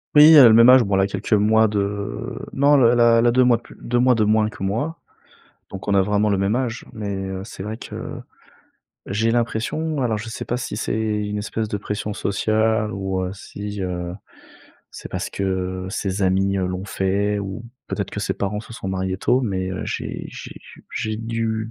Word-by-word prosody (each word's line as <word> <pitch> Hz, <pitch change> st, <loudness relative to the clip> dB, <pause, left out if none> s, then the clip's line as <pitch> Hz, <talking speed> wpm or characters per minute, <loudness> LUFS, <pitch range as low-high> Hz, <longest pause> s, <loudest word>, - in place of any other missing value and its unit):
Oui, 150 Hz, +2 st, +9 dB
elle 145 Hz, -5 st, +10 dB
a -, -, +10 dB
le 110 Hz, -, +6 dB
même 115 Hz, +2 st, +8 dB
âge, 130 Hz, 0 st, +8 dB
bon, 100 Hz, -2 st, 0 dB
elle 95 Hz, -, +3 dB
a 95 Hz, -, +2 dB
quelques 100 Hz, +3 st, -3 dB
mois 110 Hz, +1 st, +4 dB
de, 105 Hz, -, -2 dB
heu, 100 Hz, 0 st, -4 dB
non, 145 Hz, +2 st, +4 dB
elle 120 Hz, 0 st, +3 dB
a 115 Hz, 0 st, +6 dB
elle 115 Hz, -, +2 dB
a 120 Hz, -, +5 dB
2 130 Hz, +1 st, +4 dB
mois 120 Hz, -2 st, +4 dB
de -, -, -16 dB
plu -, -, -15 dB
2 120 Hz, +1 st, 0 dB
mois 125 Hz, 0 st, +4 dB
de 110 Hz, -, +2 dB
moins 110 Hz, 0 st, +3 dB
que 105 Hz, -, -9 dB
moi, 120 Hz, +12 st, -2 dB, 0.7 s
donc 95 Hz, +1 st, -8 dB
on 100 Hz, -, +2 dB
a 100 Hz, -, +5 dB
vraiment 105 Hz, +2 st, +1 dB
le 100 Hz, -, +2 dB
même 100 Hz, +3 st, +1 dB
âge, 125 Hz, -2 st, -2 dB
mais, 105 Hz, -3 st, -4 dB, 0.2 s
heu, 95 Hz, 0 st, -4 dB
c'est 95 Hz, -3 st, -9 dB
vrai 110 Hz, +3 st, -5 dB
que, -, -, -9 dB, 1.1 s
j'ai 115 Hz, +3 st, 0 dB
l'impression, 120 Hz, +6 st, -1 dB
alors 110 Hz, -4 st, 0 dB
je 115 Hz, +2 st, -7 dB
sais 115 Hz, -, -6 dB
pas 120 Hz, -, -2 dB
si 120 Hz, -4 st, -4 dB
c'est 110 Hz, -, -2 dB
une 105 Hz, -1 st, -2 dB
espèce 110 Hz, +1 st, -3 dB
de 105 Hz, -, -2 dB
pression 105 Hz, +1 st, -4 dB
sociale 110 Hz, +2 st, 0 dB
ou, 95 Hz, -1 st, -2 dB
heu, 90 Hz, -, -3 dB
si, 100 Hz, +1 st, -7 dB
heu, 90 Hz, -1 st, -4 dB, 0.8 s
c'est -, -, -9 dB
parce -, -, -4 dB
que 95 Hz, -1 st, -2 dB
ses 95 Hz, 0 st, -3 dB
amis, 95 Hz, +1 st, +2 dB
heu, 95 Hz, -, 0 dB
l'ont 90 Hz, +1 st, -4 dB
fait 100 Hz, +1 st, 0 dB
ou 100 Hz, +3 st, -6 dB, 0.2 s
peut-être -, -, -3 dB
que -, -, -5 dB
ses -, -, -1 dB
parents 100 Hz, +1 st, -2 dB
se 115 Hz, +1 st, -12 dB
sont 95 Hz, -, -6 dB
mariés 95 Hz, 0 st, -2 dB
tôt, 125 Hz, +6 st, +2 dB
mais, 95 Hz, -5 st, -2 dB
heu, 95 Hz, -, -4 dB
j'ai -, -, -4 dB
j'ai -, -, -9 dB
j -, -, -16 dB
j'ai 110 Hz, 0 st, -2 dB
du 115 Hz, -1 st, -2 dB
105 Hz, 225 wpm, -22 LUFS, 95-115 Hz, 1.1 s, elle